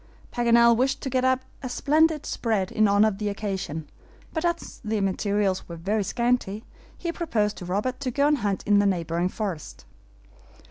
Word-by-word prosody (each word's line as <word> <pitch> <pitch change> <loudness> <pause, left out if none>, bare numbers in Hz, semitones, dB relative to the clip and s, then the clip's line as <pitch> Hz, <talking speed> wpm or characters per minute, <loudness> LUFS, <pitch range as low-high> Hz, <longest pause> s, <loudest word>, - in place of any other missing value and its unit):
Paganel 235 -1 +5
wished 265 +3 +1
to 265 - -4
get 255 0 +1
up 260 0 +3 0.2
a 255 - -4
splendid 305 +4 +2
spread 210 -5 -1
in 215 0 +3
honor 205 +2 +5
of 205 -2 -2
the 210 -1 -1
occasion, 190 -7 -4 0.5
but 320 - -2
as 340 -1 -2
the 215 -1 -1
materials 195 -1 0
were 170 - -6
very 200 +6 -1
scanty, 235 -1 0 0.3
he 340 - -3
proposed 230 - -1
to 180 - -7
Robert 210 +8 -2
to 275 -2 -2
go 280 +3 +1
and 295 -1 +3
hunt 200 -3 -1
in 205 -1 +4
the 205 - +3
neighboring 170 -1 0
forest. 190 -7 -5
215 Hz, 180 wpm, -25 LUFS, 195-255 Hz, 0.5 s, Paganel